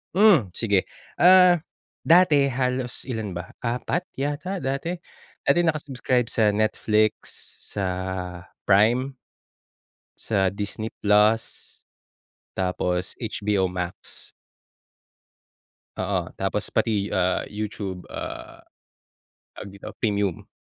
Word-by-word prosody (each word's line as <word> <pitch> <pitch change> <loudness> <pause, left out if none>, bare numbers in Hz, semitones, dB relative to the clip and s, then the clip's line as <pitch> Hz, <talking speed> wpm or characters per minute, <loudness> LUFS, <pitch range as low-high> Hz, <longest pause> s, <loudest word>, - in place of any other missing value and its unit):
Hmm, 180 - +5
sige. 100 -5 +1 0.3
Ah, 180 0 +7 0.5
dati 165 -5 +6
halos 125 -1 -1
ilan 110 -5 -3
ba? 90 0 -6 0.2
4 125 +9 -1
yata 145 +7 -3
dati. 140 +6 -2 0.5
Dati - - +3
naka-subscribe 135 -6 0
sa 105 -2 +2
Netflix, 110 0 +2 0.6
sa 100 - -1 0.8
Prime. 120 +7 +4 1.0
Sa 95 -3 0
Disney 105 +2 -4
Plus. 105 +2 +2 0.7
Tapos 90 -1 -1
HBO 105 -4 0
Max. 90 -1 -6 1.7
Oo, 95 -2 -2
tapos 95 +2 -2
pati, 105 -5 +1
ah, 90 0 +1
YouTube, 105 -3 -5
ah, - - -7 0.9
tawag - - -9
dito? 100 0 -10
Premium. 100 -5 -1
110 Hz, 90 wpm, -24 LUFS, 100-135 Hz, 1.7 s, Ah